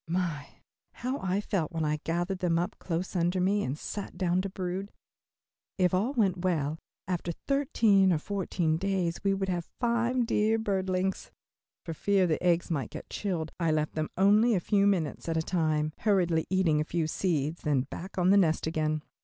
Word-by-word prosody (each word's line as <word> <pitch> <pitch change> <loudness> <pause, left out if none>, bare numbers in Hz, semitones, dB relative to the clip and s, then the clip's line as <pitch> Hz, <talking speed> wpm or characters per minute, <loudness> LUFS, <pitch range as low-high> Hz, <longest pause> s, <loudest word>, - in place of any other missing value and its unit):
My, 165 -4 -3 0.3
how 255 +3 -3
I 190 +1 0
felt 190 -6 -2
when 165 -2 -1
I 150 0 0
gathered 175 +3 -1
them 170 -2 +1
up 175 +1 -1
close 180 +2 -3
under 175 +1 +1
me 200 +3 +2
and 130 +3 -3
sat 205 +5 -6
down 180 -1 +1
to 195 - -4
brood. 185 +2 -4 0.9
If 180 -2 +2
all 210 +9 +1
went 200 -8 +2
well, 160 -4 0 0.3
after 175 -2 -2 0.2
thirteen 225 -9 +3
or 170 - +3
fourteen 170 -2 -1
days, 185 -2 -1
we 195 -1 +2
would 195 0 -2
have 175 -2 -2
five 240 +1 +1
dear 220 0 +2
birdlings. 190 -3 -1 0.6
For 165 - -4
fear 195 +4 +2
the 160 -3 0
eggs 175 -1 +2
might 140 -8 -1
get - - -9
chilled 170 -6 -2
I 165 -2 +1
left 155 0 0
them 155 0 -2
only 210 +4 +5
a - - +2
few 200 +2 +2
minutes 170 -5 0
at 165 - 0
a 160 - +1
time, 155 -3 0
hurriedly 175 -6 +2
eating 175 -5 +2
a - - +1
few 160 +1 -1
seeds, 155 -1 -1
then 145 -4 +1
back 170 +9 -8
on 180 +1 +4
the 200 - +6
nest 160 -5 +2
again. 155 -1 -1
180 Hz, 185 wpm, -29 LUFS, 160-195 Hz, 0.9 s, the